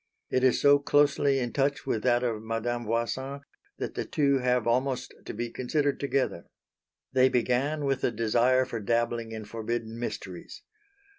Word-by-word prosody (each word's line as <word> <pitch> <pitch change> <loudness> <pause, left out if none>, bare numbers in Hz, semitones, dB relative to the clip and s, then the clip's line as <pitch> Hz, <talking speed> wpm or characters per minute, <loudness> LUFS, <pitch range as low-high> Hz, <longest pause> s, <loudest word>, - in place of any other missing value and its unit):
It 130 - +1
is 130 - +4
so 145 0 +6
closely 145 -1 +3
in 120 -3 -2
touch 140 0 0
with 110 - -1
that 120 0 +2
of 115 -3 -1
Madame 115 +2 -2
Voisin 130 +5 -2 0.4
that - - -4
the - - -2
two 140 -2 +1
have 125 -2 +1
almost 125 +2 0
to - - -5
be 120 +1 -3
considered 140 +3 -1
together. 135 -10 -1 0.7
They 130 0 +5
began 130 +5 0
with 135 -1 0
the - - +2
desire 120 +3 +2
for 115 - -5
dabbling 115 +1 -1
in 110 -1 -6
forbidden 115 +1 -4
mysteries. 120 - -6
125 Hz, 160 wpm, -28 LUFS, 115-135 Hz, 0.7 s, so